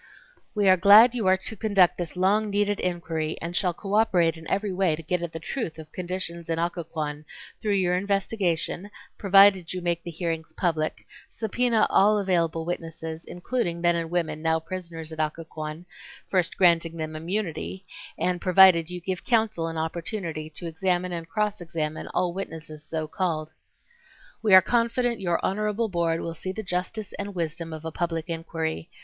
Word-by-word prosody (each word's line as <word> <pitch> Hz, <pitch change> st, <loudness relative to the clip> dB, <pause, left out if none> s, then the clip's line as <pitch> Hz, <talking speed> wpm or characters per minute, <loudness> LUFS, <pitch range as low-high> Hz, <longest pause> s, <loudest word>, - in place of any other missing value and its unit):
We 205 Hz, -2 st, +2 dB
are 185 Hz, 0 st, +7 dB
glad 210 Hz, +6 st, +8 dB
you 225 Hz, -6 st, -1 dB
are 185 Hz, 0 st, +5 dB
to 205 Hz, +4 st, -4 dB
conduct 195 Hz, -5 st, +3 dB
this 175 Hz, 0 st, -4 dB
long 205 Hz, +4 st, +2 dB
needed 205 Hz, 0 st, +1 dB
inquiry 165 Hz, -3 st, -2 dB
and 170 Hz, +1 st, -5 dB
shall 180 Hz, -1 st, +2 dB
cooperate 195 Hz, -5 st, +2 dB
in 160 Hz, 0 st, -10 dB
every 200 Hz, 0 st, 0 dB
way 180 Hz, -4 st, +2 dB
to 165 Hz, -, -10 dB
get 180 Hz, +2 st, -1 dB
at 170 Hz, -2 st, -4 dB
the 165 Hz, -, -6 dB
truth 165 Hz, -, -4 dB
of 155 Hz, -1 st, -11 dB
conditions 175 Hz, -2 st, -5 dB
in 165 Hz, -, 0 dB
Occoquan 160 Hz, -3 st, -3 dB, 0.4 s
through 210 Hz, -2 st, +1 dB
your 180 Hz, -2 st, +2 dB
investigation, 195 Hz, -1 st, -1 dB, 0.3 s
provided 195 Hz, -3 st, +5 dB
you 185 Hz, -, -3 dB
make 170 Hz, -1 st, -1 dB
the 170 Hz, -, -7 dB
hearings 165 Hz, -1 st, -4 dB
public, 160 Hz, -4 st, -1 dB, 0.2 s
subpoena 230 Hz, 0 st, +1 dB
all 210 Hz, +2 st, +5 dB
available 170 Hz, -5 st, 0 dB
witnesses, 165 Hz, -1 st, -5 dB
including 175 Hz, 0 st, -2 dB
men 175 Hz, 0 st, +3 dB
and 165 Hz, -1 st, -2 dB
women 165 Hz, -3 st, -1 dB
now 160 Hz, 0 st, +2 dB
prisoners 165 Hz, -1 st, -6 dB
at 160 Hz, -, -8 dB
Occoquan, 155 Hz, +1 st, -4 dB, 0.5 s
first 185 Hz, -2 st, +1 dB
granting 170 Hz, -2 st, +3 dB
them 155 Hz, -1 st, -4 dB
immunity, 185 Hz, +2 st, -4 dB, 0.3 s
and 180 Hz, -1 st, 0 dB
provided 185 Hz, -3 st, +6 dB
you 180 Hz, 0 st, -5 dB
give 185 Hz, 0 st, -4 dB
counsel 220 Hz, -8 st, +1 dB
an 165 Hz, 0 st, -5 dB
opportunity 160 Hz, 0 st, -4 dB
to 160 Hz, +3 st, -6 dB
examine 180 Hz, +2 st, 0 dB
and 165 Hz, -1 st, -5 dB
cross 210 Hz, 0 st, -1 dB
examine 160 Hz, -2 st, -4 dB
all 180 Hz, -1 st, 0 dB
witnesses 160 Hz, -5 st, -7 dB
so 155 Hz, 0 st, -3 dB
called. 160 Hz, -2 st, -2 dB, 0.9 s
We 210 Hz, -4 st, +6 dB
are 185 Hz, -, +9 dB
confident 235 Hz, 0 st, +1 dB
your 175 Hz, -3 st, +1 dB
honorable 210 Hz, +3 st, 0 dB
board 170 Hz, -2 st, 0 dB
will 165 Hz, -, -4 dB
see 185 Hz, +3 st, -5 dB
the 220 Hz, +3 st, -5 dB
justice 185 Hz, +3 st, -3 dB
and 200 Hz, -1 st, -5 dB
wisdom 165 Hz, -1 st, -3 dB
of 160 Hz, 0 st, -7 dB
a 160 Hz, -, -3 dB
public 165 Hz, 0 st, -3 dB
inquiry. 165 Hz, 0 st, -3 dB
175 Hz, 170 wpm, -26 LUFS, 165-195 Hz, 0.9 s, are